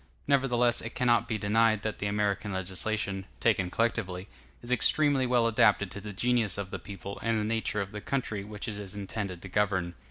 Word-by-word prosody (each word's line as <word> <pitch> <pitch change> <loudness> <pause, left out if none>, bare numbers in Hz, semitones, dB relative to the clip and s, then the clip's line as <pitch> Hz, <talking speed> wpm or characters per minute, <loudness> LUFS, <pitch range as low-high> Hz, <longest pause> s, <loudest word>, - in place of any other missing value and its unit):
Nevertheless, 125 -4 +3
it 110 - -7
cannot 120 -2 +2
be 110 - -1
denied 110 +1 +2
that 110 -1 -3
the 100 - -1
American 105 0 -1
legislation, 95 +1 -2
taken 95 -6 +2
collectively, 100 -4 -1 0.3
is 120 - -6
extremely 135 +2 +4
well 120 -2 +3
adapted 105 -3 +3
to 100 - -7
the 105 +1 -7
genius 115 -1 +1
of 100 -1 -5
the 95 - -4
people 100 +1 -8
and 115 -1 +1
the - - -1
nature 110 -1 -1
of 100 0 -5
the 105 - -6
country 115 -6 -2
which 105 0 -7
it 105 -2 -4
is 100 -1 -4
intended 100 -3 -5
to - - -7
govern. 95 -3 0
105 Hz, 195 wpm, -29 LUFS, 100-115 Hz, 0.3 s, extremely